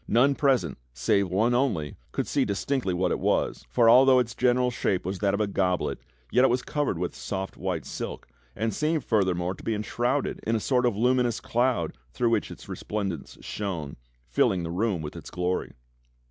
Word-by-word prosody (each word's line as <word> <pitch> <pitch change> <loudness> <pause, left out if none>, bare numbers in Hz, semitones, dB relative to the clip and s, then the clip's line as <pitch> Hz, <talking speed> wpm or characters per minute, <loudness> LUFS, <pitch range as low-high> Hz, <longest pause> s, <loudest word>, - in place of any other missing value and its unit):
None 130 +5 +4
present, 135 - +1 0.2
save 95 +9 +2
one 110 +7 +2
only, 105 - 0 0.2
could - - -1
see 140 - +1
dis 100 -4 -2
tinctly 130 -9 0
what 90 +1 +1
it - - 0
was, - - 0
for 120 -2 +3
although 130 +2 +7
its 120 -2 +1
general 125 +1 +2
shape 95 -6 -1
was 95 0 -3
that 100 -1 +2
of - - -3
a 105 - +2
Goblet, 95 -2 0 0.3
yet 125 - +4
it - - +6
was 125 +1 +1
covered 145 - -1
with 90 +1 -2
soft 95 -1 -5
white 90 -4 -3
silk, - - -6 0.3
and 110 0 -1
seemed 155 +3 0
further 95 -5 +2
more 90 +1 -2
to - - -13
be 115 - 0
enshrouded 120 +6 -1
in 115 - 0
a - - +1
sort 125 +2 +2
of 110 -4 -1
luminous 125 0 +2
cloud 125 +1 0 0.2
through 120 - +1
which - - +1
its - - -11
resplendence 95 -9 -4
shone, 85 -9 -4 0.3
filling 85 +9 +2
the 85 - -4
room 95 -2 0
with 75 - -6
its - - -8
glory. 90 +1 -2
110 Hz, 200 wpm, -27 LUFS, 95-125 Hz, 0.3 s, although